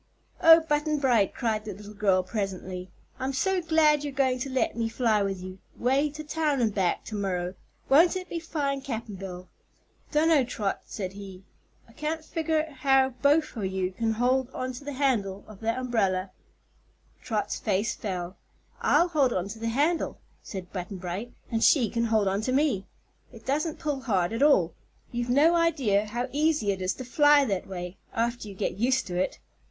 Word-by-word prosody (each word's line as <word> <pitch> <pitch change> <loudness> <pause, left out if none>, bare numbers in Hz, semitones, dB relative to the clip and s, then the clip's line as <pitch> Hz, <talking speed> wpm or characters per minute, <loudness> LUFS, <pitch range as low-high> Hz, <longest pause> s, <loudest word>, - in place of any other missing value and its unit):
"Oh, 330 0 +9
Button 300 -1 0
Bright!" 240 -8 +3
cried 220 -3 -1
the 210 -3 -5
little 210 +1 -11
girl, 195 -3 +2
presently; 185 -2 -4 0.3
"I'm 265 +1 -2
so 370 +8 +1
glad 310 -3 +3
you're 290 - -3
going 260 -2 +1
to 270 - -3
let 260 -1 0
me 230 -1 -1
fly 225 -3 +2
with 195 -2 -2
you 185 +1 -8 0.2
way 270 +5 +2
to 305 +2 -8
town 300 -2 0
and 225 -4 +1
back 190 -4 0
to 215 - -7
morrow. 180 -3 -2 0.3
Won't 330 +7 +5
it 370 0 -4
be 340 - -4
fine, 285 -4 -2
Cap'n 230 -5 -5
Bill?" 185 -1 -8 0.6
"Dunno, 310 -2 +4
Trot," 210 -5 -2
said 190 -3 -5
he. 195 -2 -10 0.4
"I 230 - -19
can't 310 +4 -3
figger 315 -1 -1
how 270 -1 +4
both 300 +2 +3
o' 225 - -4
you 190 -1 -1
can 225 +3 -1
hold 250 +3 +1
on 255 0 -3
to 250 - -9
the 290 0 -5
handle 225 -8 0
o' 215 - -10
that 225 +4 -2
umbrel." 200 -7 0 0.9
Trot's 215 -3 -2
face 205 +1 0
fell. 185 -2 -5 0.4
"I'll 350 - +4
hold 285 -6 +2
on 185 -2 -2
to 220 +2 -8
the 230 0 -2
handle," 295 +8 0 0.2
said 185 -3 -8
Button 185 +1 -5
Bright, 185 +6 -5 0.2
"and 225 -1 +1
she 245 -9 +4
can 235 0 0
hold 220 -3 +2
on 195 +2 0
to 255 - -1
me. 260 -8 +1 0.4
It 230 -2 -14
doesn't 300 +4 -1
pull 295 -4 -2
hard 195 -7 0
at 230 - -2
all. 190 - +4 0.4
You've 240 0 -3
no 295 +7 +5
idea 255 -12 +2
how 240 +4 -2
easy 300 -7 +2
it 190 -1 -4
is 185 0 0
to 255 - -7
fly 290 +2 +5
that 195 -6 -2
way 180 -1 -6 0.2
after 235 0 -1
you 200 - -9
get 185 - -3
used 255 +3 +2
to 180 - -5
it." 180 - -1
235 Hz, 190 wpm, -27 LUFS, 195-285 Hz, 0.9 s, Oh